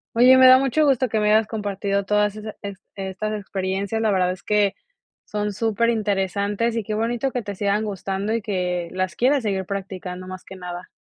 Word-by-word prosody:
Oye, 255 +2 +7
me 260 0 +8
da 255 0 +9
mucho 275 +3 +2
gusto 265 -2 +3
que 220 -1 0
me 210 0 +2
hayas 220 0 +5
compartido 200 -2 -2
todas 210 +1 +1
esas 215 0 -7
est 200 -1 -6 0.2
estas 195 +2 -4
experiencias. 195 +2 -2
La 220 - +2
verdad 180 -2 +2
es 185 - -7
que 210 -1 +2 0.5
son 210 0 -2
superinteresantes 210 -1 0
y 230 - -1
qué 215 +1 -3
bonito 240 +4 -1
que 245 -3 -3
te 205 - -5
sigan 205 +2 0
gustando 195 +1 -3
y 230 - 0
que 180 -4 -2
las 185 -1 -2
quieras 260 +3 +2
seguir 190 -3 -1
practicando 185 -2 -5
más 185 0 -8
que 190 - -11
nada. 180 -1 -7
205 Hz, 195 wpm, -23 LUFS, 190-225 Hz, 0.5 s, da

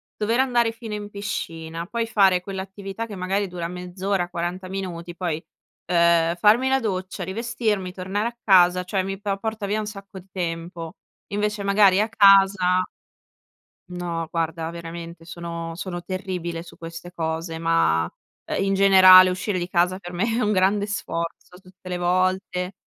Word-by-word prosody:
dover 225 +4 0
andare 240 -3 +2
fino 225 -1 -8
in 205 0 -5
piscina, 165 -5 -5
poi 230 +1 -2
fare 195 -5 +3
quell'attività 195 +3 -6
che 205 - -8
magari 190 +2 -1
dura 175 -2 -5
mezz'ora, 180 +1 -3
40 175 +2 -4
minuti, 175 -3 -5
poi, 170 -3 -3 0.4
uhm, 170 -1 +3
farmi 220 +8 +4
la 265 - +3
doccia, 190 -4 -3
rivestirmi, 210 -1 -2
tornare 190 +4 -2
a 235 0 -7
casa, 180 -2 +5
cioè 190 +1 -1
mi 195 +1 -4
po 200 -1 -1
porta 220 0 -3
via 210 +2 -1
un 215 - -4
sacco 195 -2 -9
di 185 - -18
tempo, 165 -1 -5 0.3
invece 210 0 -1
magari 200 -1 +5
a 215 - +1
casa 195 -3 +5 1.0
No, 175 -2 -4
guarda 165 0 -2
veramente 170 0 -8
sono 170 0 -6
sono 175 0 -5
terribile 180 -3 -4
su 170 - -14
queste 165 +1 -9
cose, 160 0 -3
ma, 165 - +2
uhm, 85 - -7
in 195 - +1
generale 185 -1 +8
uscire 185 +2 -2
di 175 +1 -4
casa 180 +1 +2
per 175 -2 -9
me 180 +5 -1
è 230 +1 0
un 210 - +1
grande 200 +1 +2
sforzo 170 -3 -5
tutte 185 0 -17
le 180 -1 -2
volte. 185 +1 0
185 Hz, 160 wpm, -23 LUFS, 170-200 Hz, 1.0 s, generale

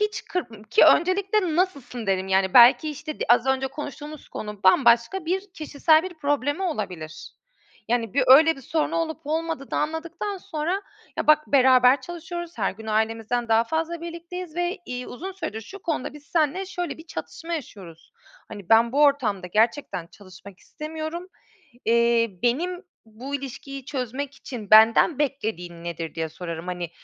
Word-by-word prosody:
Hiç 420 0 -1
kır 360 -9 -3 0.2
ki 440 - +6
öncelikle 370 -1 +3
nasılsın, 280 - -2
dedim. 190 -1 0
Yani 190 0 +1
belki 250 +6 +7
işte 300 +1 -7
d - - 0
az 240 +2 +4
önce 265 0 +1
konuştuğumuz 295 +1 -8
konu 210 -1 -7
bambaşka 235 - +4
bir 370 +4 -1
kişisel 315 0 +2
bir 370 0 -7
problemi 290 +2 -1
olabilir. 180 - -5 0.6
Yani 230 -2 -1
bir 265 -2 +3
öyle 315 +5 +7
bir 270 - -11
sorunu 320 +4 -1
olup 320 -1 -2
olmadığını 315 -2 -3
anladıktan 330 +6 -3
sonra, 345 +4 -3 0.3
ya - - -2
bak 305 0 +5
beraber 255 -1 +5
çalışıyoruz, 345 0 -7
her 195 - +1
gün 220 +3 -12
ailemizden 225 +2 -1
daha 225 +1 +4
fazla 325 +5 -2
birlikteyiz 340 0 -7
ve, 350 +2 -1
iii, 250 0 -5
uzun 370 +10 -7
süredir 220 - -5
şu 390 - -12
konuda 310 -7 -3
biz 295 - -12
seninle 335 +3 +1
şöyle 355 -3 -5
bir 320 - -13
çatışma 335 +1 -7
yaşıyoruz. 190 - -9 0.4
Hani, 200 -4 -10
ben 230 +1 +5
bu 285 +2 +3
ortamda 250 -10 +2
gerçekten 215 - 0
çalışmak 185 +1 -15
istemiyorum. 315 +3 -6 0.6
Eee, 235 0 +3
benim 350 +10 0 0.2
bu 240 +6 -8
ilişkiyi 275 0 -6
çözmek 265 +1 -4
için 220 -6 -9
benden 225 +7 +6
beklediğin 210 - -3
nedir 165 -1 -5
diye 160 -1 -3
sorarım. 170 +1 -7
Hani, 175 -2 -4
275 Hz, 155 wpm, -24 LUFS, 225-325 Hz, 0.6 s, belki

